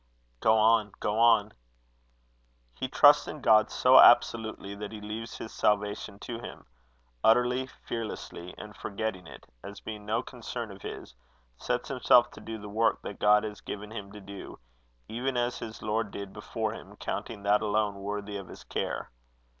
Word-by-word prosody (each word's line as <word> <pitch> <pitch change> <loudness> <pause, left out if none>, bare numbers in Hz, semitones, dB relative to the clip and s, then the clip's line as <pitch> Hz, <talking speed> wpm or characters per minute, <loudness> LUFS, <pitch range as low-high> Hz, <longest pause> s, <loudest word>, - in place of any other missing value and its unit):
"Go 110 0 +4
on, 110 -1 +4
go 105 +1 -1
on." 110 -3 +5 1.2
"He 130 - -4
trusts 145 +3 +6
in 155 - -6
God 110 -3 +5
so 130 +1 +6
absolutely, 110 -4 +5
that 100 0 -7
he 110 - -7
leaves 110 +2 -6
his 110 - -8
salvation 105 0 0
to 115 -1 -5
him 120 - -9 0.6
utterly, 125 +3 +3
fearlessly; 110 -8 -7
and, 105 0 -10
forgetting 100 -4 -4
it, - - -12 0.2
as 100 +1 -8
being 105 -1 -7
no 115 +3 0
concern 120 -3 -6
of 100 -1 -12
his, - - -8 0.4
sets - - -2
himself - - +4
to - - -12
do 110 0 -6
the 105 -1 -9
work 110 +2 +1
that 100 - -7
God 105 0 +5
has 105 -1 -6
given 105 +1 -7
him 100 -3 -7
to 105 - -9
do, 100 0 -9 0.5
even 125 +3 -2
as 120 0 0
his 110 -1 -8
Lord 110 0 -1
did 100 -1 -7
before - - -3
him, - - -11
counting 105 -3 -5
that 105 +1 +3
alone 105 -1 +1
worthy 105 0 -4
of 100 -2 -8
his - - -11
care. - - -4
110 Hz, 170 wpm, -29 LUFS, 105-115 Hz, 1.2 s, trusts